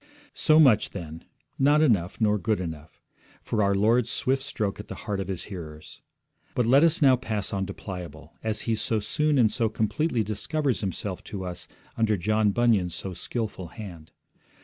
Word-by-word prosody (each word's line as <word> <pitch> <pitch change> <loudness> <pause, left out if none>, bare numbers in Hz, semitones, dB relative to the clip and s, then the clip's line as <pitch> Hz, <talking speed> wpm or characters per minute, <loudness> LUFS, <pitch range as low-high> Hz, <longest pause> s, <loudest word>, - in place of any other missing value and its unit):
So 155 -1 +4
much, 130 -9 +5
then, 80 -4 -8 0.3
not 145 +3 +5
enough, 100 - +1
nor 105 -2 +2
good 105 +3 0
enough 80 -4 -7 0.4
for 110 - -1
our 100 -1 +2
Lord's 115 +4 +3
swift 135 +3 +1
stroke 115 -9 -3
at 105 - -8
the - - -7
heart 100 -2 -2
of 95 - -3
His 95 -3 -4
hearers. 80 -6 -9 0.5
But 125 - +2
let 135 +6 +5
us 165 -1 +4
now 130 -2 +7
pass 110 -5 -3
on 95 -1 -1
to 100 - -5
Pliable, 90 -6 -8
as 110 -1 -1
he 115 - -1
so 110 0 0
soon 150 +7 +1
and 115 -4 +4
so 115 -2 0
completely 115 +4 0
discovers 130 - -1
himself 95 -1 -4
to 95 -2 -6
us 90 -1 -6 0.3
under 110 -2 +2
John 105 +3 +2
Bunyan's 100 -5 +2
so 95 - -5
skilful 100 0 -4
hand. 85 -5 -10
105 Hz, 180 wpm, -26 LUFS, 95-120 Hz, 0.5 s, now